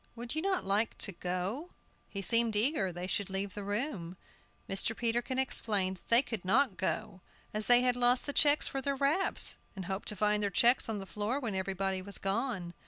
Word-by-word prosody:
"Would 235 Hz, 0 st, -4 dB
you 315 Hz, -, -1 dB
not 380 Hz, -, -1 dB
like 205 Hz, +3 st, 0 dB
to 200 Hz, -, +1 dB
go?" 185 Hz, -, -4 dB, 0.4 s
He 195 Hz, -1 st, -5 dB
seemed 230 Hz, +2 st, +3 dB
eager 210 Hz, -, +1 dB
they 175 Hz, +1 st, -6 dB
should 195 Hz, +1 st, -2 dB
leave 195 Hz, +1 st, -3 dB
the 205 Hz, -, -6 dB
room. 205 Hz, -, -3 dB, 0.5 s
Mr. 195 Hz, +3 st, 0 dB
Peterkin 240 Hz, +2 st, 0 dB
explained 205 Hz, -7 st, 0 dB
that -, -, -26 dB
they 235 Hz, +2 st, +7 dB
could 225 Hz, -8 st, -5 dB
not 225 Hz, +3 st, +2 dB
go, 190 Hz, +1 st, -3 dB, 0.3 s
as 215 Hz, 0 st, -2 dB
they 245 Hz, 0 st, +7 dB
had 250 Hz, -1 st, +2 dB
lost 245 Hz, 0 st, +3 dB
the 285 Hz, -, -3 dB
checks 290 Hz, +1 st, +4 dB
for 270 Hz, -, -3 dB
their 280 Hz, +1 st, -1 dB
wraps, 290 Hz, +8 st, +1 dB, 0.2 s
and 190 Hz, -2 st, -6 dB
hoped 190 Hz, +2 st, -4 dB
to 210 Hz, -, -1 dB
find 210 Hz, +1 st, +1 dB
their 205 Hz, -, +1 dB
checks 240 Hz, +5 st, +3 dB
on 220 Hz, -, -1 dB
the 195 Hz, -, -6 dB
floor 210 Hz, +7 st, -2 dB
when 235 Hz, -7 st, -3 dB
everybody 190 Hz, 0 st, -2 dB
was 200 Hz, +1 st, -1 dB
gone. 195 Hz, -3 st, -2 dB
210 Hz, 205 wpm, -31 LUFS, 195-245 Hz, 0.5 s, they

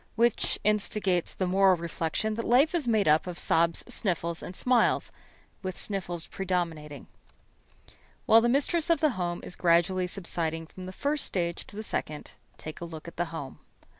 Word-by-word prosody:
Which 235 Hz, 0 st, +2 dB
instigates 205 Hz, -3 st, +1 dB
the 190 Hz, -, -2 dB
moral 190 Hz, 0 st, +4 dB
reflection 170 Hz, +5 st, -2 dB
that 230 Hz, +2 st, -3 dB
life 265 Hz, +9 st, +4 dB
is 325 Hz, -7 st, 0 dB
made 220 Hz, -5 st, +2 dB
up 155 Hz, +4 st, +4 dB
of 175 Hz, -1 st, -5 dB
sobs, 165 Hz, 0 st, +1 dB
sniffles, 170 Hz, -8 st, -1 dB
and 180 Hz, -, -7 dB
smiles, 250 Hz, +2 st, +2 dB, 0.5 s
with 185 Hz, -2 st, -5 dB
sniffles 180 Hz, -4 st, -2 dB
predominating. 165 Hz, -6 st, -3 dB, 1.2 s
While 225 Hz, +1 st, +7 dB
the 240 Hz, -, +2 dB
mistress 300 Hz, +6 st, +2 dB
of 335 Hz, -, +4 dB
the 310 Hz, -3 st, +3 dB
home 175 Hz, -5 st, -3 dB
is -, -, -5 dB
gradually 180 Hz, +2 st, +2 dB
subsiding 165 Hz, -3 st, -3 dB
from 185 Hz, +3 st, -10 dB
the -, -, -6 dB
first 285 Hz, +9 st, 0 dB
stage 170 Hz, -2 st, -2 dB
to -, -, -10 dB
the 215 Hz, -, -5 dB
second, 150 Hz, -7 st, -4 dB, 0.3 s
take 155 Hz, +1 st, -7 dB
a -, -, -3 dB
look 160 Hz, -1 st, -9 dB
at 170 Hz, -, -10 dB
the 175 Hz, -, +1 dB
home. 160 Hz, -5 st, -7 dB
185 Hz, 170 wpm, -28 LUFS, 170-220 Hz, 1.2 s, While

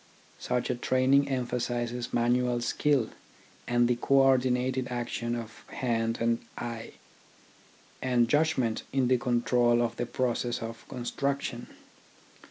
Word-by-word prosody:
Such 125 Hz, 0 st, -1 dB
a -, -, -1 dB
training 130 Hz, +3 st, +3 dB
emphasises 120 Hz, -2 st, -2 dB
manual 120 Hz, +1 st, +2 dB
skill, 135 Hz, -1 st, +1 dB, 0.6 s
and 120 Hz, 0 st, +3 dB
the 120 Hz, 0 st, +1 dB
co 140 Hz, -, +1 dB
ordinated 130 Hz, -1 st, +3 dB
action 120 Hz, -1 st, -3 dB
of 115 Hz, -2 st, -8 dB
hand 115 Hz, -2 st, -1 dB
and 115 Hz, 0 st, +1 dB, 0.2 s
eye, 115 Hz, -1 st, -6 dB, 1.1 s
and 125 Hz, -2 st, +2 dB
judg 155 Hz, +5 st, +2 dB
ment 115 Hz, -4 st, 0 dB
in 130 Hz, -2 st, +1 dB
the 130 Hz, -1 st, +3 dB
control 120 Hz, -1 st, +2 dB
of 115 Hz, -1 st, -1 dB
the 120 Hz, -, -2 dB
process 120 Hz, -1 st, -1 dB
of 115 Hz, 0 st, -8 dB
construction. 125 Hz, 0 st, -3 dB
120 Hz, 125 wpm, -29 LUFS, 120-130 Hz, 1.1 s, training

